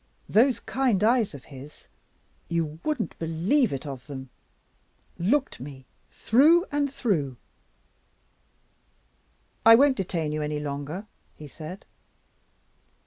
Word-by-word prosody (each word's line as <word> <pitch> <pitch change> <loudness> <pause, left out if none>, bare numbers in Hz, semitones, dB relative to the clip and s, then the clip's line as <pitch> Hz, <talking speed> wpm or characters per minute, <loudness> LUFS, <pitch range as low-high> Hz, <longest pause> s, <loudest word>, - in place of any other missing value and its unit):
Those 250 +4 +4
kind 245 -7 0
eyes 225 - +2
of 135 - -11
his 140 +1 -13 0.6
you 160 -2 -2
wouldn't 300 -8 -2
believe 175 - +1
it 135 +2 -4
of 135 -2 -7
them! 130 -3 -8 0.9
looked 265 +11 +1
me 135 0 -10 0.2
through 315 - +4
and 290 -1 0
through. 175 - -1 2.3
'I 225 0 +9
won't 275 +2 +4
detain 170 -5 -2
you 155 0 -2
any 150 0 -2
longer,' 150 +6 -5 0.3
he 150 - -10
said. 160 +6 -9
170 Hz, 110 wpm, -26 LUFS, -, 2.3 s, I